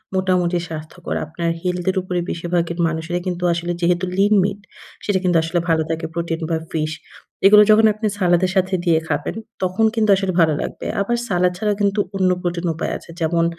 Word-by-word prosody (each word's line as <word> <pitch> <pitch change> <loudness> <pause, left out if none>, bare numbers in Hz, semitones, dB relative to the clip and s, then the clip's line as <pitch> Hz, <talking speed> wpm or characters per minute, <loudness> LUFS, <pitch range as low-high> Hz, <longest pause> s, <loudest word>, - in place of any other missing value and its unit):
মোটামুটি 180 -2 +1
স্বাস্থ্যকর। 160 +2 -6
আপনার 165 +2 -3
হেলথ 180 -1 -2
এর 185 - -6
উপরে 180 -1 -2
বেশিরভাগের 170 0 -2
মানুষেরা 165 +2 -2
কিন্তু 180 0 -3
আসলে 170 +1 -3
যেহেতু 175 +1 +2
lean 200 +2 +4
meat 200 0 -2 0.5
সেটা 200 -2 +1
কিন্তু 175 -2 +3
আসলে 170 +2 0
ভালো 160 -1 +3
থাকে 165 0 -2
প্রোটিন 170 -1 -2
বা 165 - +1
ফিশ। 155 -1 -1 0.5
এইগুলো 210 +1 +9
যখন 220 +1 +6
আপনি 215 +1 -2
সালাদের 180 0 +2
সাথে 190 0 +2
দিয়ে 165 -2 +4
খাবেন 145 -1 -2 0.3
তখন 185 +4 +1
কিন্তু 220 -2 +1
আসলে 190 -1 -1
ভালো 160 -2 +4
লাগবে। - - -6 0.2
আবার 240 +4 0
সালাদ 180 -1 +2
ছাড়া 210 +2 0
কিন্তু 200 +1 +1 0.2
অন্য 190 -1 +2
প্রোটিন 175 0 -2
উপায় 165 - -3
আছে। - - -18
যেমন 165 +1 +2
175 Hz, 185 wpm, -20 LUFS, 165-190 Hz, 0.5 s, এইগুলো